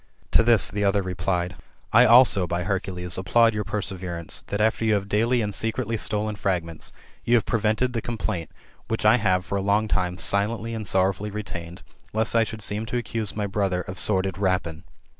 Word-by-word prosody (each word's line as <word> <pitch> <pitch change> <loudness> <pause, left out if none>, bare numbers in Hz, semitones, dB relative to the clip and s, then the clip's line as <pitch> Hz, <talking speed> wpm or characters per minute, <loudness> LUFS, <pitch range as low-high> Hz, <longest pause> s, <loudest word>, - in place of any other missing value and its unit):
To - - +5
this 115 -3 +4
the 105 +1 -2
other 100 0 +2
replied, 90 -1 -2 0.2
" - - -36
I - - +7
also, 115 -6 +6
by 85 +1 -2
Hercules, 90 -1 -2
applaud 115 +5 +3
your 105 0 -2
perseverance, 95 -5 -2
that 100 - -3
after 110 +1 +1
you 110 -1 +3
have 100 -1 -2
daily 115 +4 +1
and 105 -1 -3
secretly 115 +2 -2
stolen 105 0 -1
fragments, 85 -5 -3 0.3
you 120 - +3
have 115 - +2
prevented 115 +2 0
the 115 - -2
complaint, 95 -9 -4 0.4
which 115 -1 -3
I 110 +3 +6
have 95 -5 +1
for 100 - -2
a - - -2
long 100 +2 +1
time 90 -3 -1
silently 110 +4 0
and 110 -2 -5
sorrowfully 95 +2 0
retained, 90 -5 -7 0.3
lest 110 +1 +1
I 115 - +5
should 110 -1 -6
seem 105 +2 -2
to 125 - -2
accuse 115 -3 -3
my 105 -1 -1
brother 95 -2 -1
of 90 +1 -7
sordid 95 -2 0
rapine. 90 -4 -1
100 Hz, 195 wpm, -24 LUFS, 90-110 Hz, 0.4 s, I